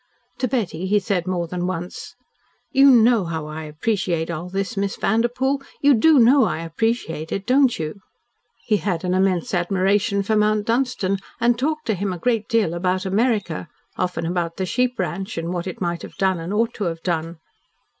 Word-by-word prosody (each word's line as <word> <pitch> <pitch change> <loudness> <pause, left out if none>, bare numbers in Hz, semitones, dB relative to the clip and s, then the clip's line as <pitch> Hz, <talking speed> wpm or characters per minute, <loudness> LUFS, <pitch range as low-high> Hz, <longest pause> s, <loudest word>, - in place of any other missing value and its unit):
To 255 - +1
Betty 190 -8 -2
he 210 +2 +3
said 190 -3 -1
more 180 -2 -1
than 180 +1 -3
once: 180 -1 -5 0.6
"You 275 +1 +6
know 235 -3 +5
how 160 -2 -4
I 155 +1 -6
appreciate 170 +1 -1
all 170 +2 -5
this, 195 +3 -3
Miss 200 0 -1
Vanderpoel. 245 +6 0 0.2
You 285 0 +5
DO 300 +6 +5
know 255 +1 +6
I 165 - -2
appreciate 165 -3 -2
it, 195 - -3
don't 260 +1 +3
you?" 155 +4 -5 0.7
He 215 - +2
had 185 -5 -2
an 180 0 0
immense 185 -2 +1
admiration 195 +3 +1
for 220 +2 0
Mount 210 0 +2
Dunstan, 230 -5 0 0.2
and 240 +1 +3
talked 310 +3 -1
to 220 - +1
him 195 0 -2
a - - -5
great 230 +1 0
deal 225 -8 +2
about 185 +2 -1
America, 200 -4 0 0.3
often 180 -2 -2
about 170 -1 -2
the 190 - -1
sheep 250 +5 0
ranch, 190 +2 -3
and 165 +2 -3
what 175 0 -3
it 185 - -7
might 170 -1 -2
have - - -10
done 190 -2 +1
and 165 +3 -5
ought 230 +3 +1
to 205 - -3
have 165 -1 -4
done. 165 -1 -2
195 Hz, 190 wpm, -22 LUFS, 175-230 Hz, 0.7 s, You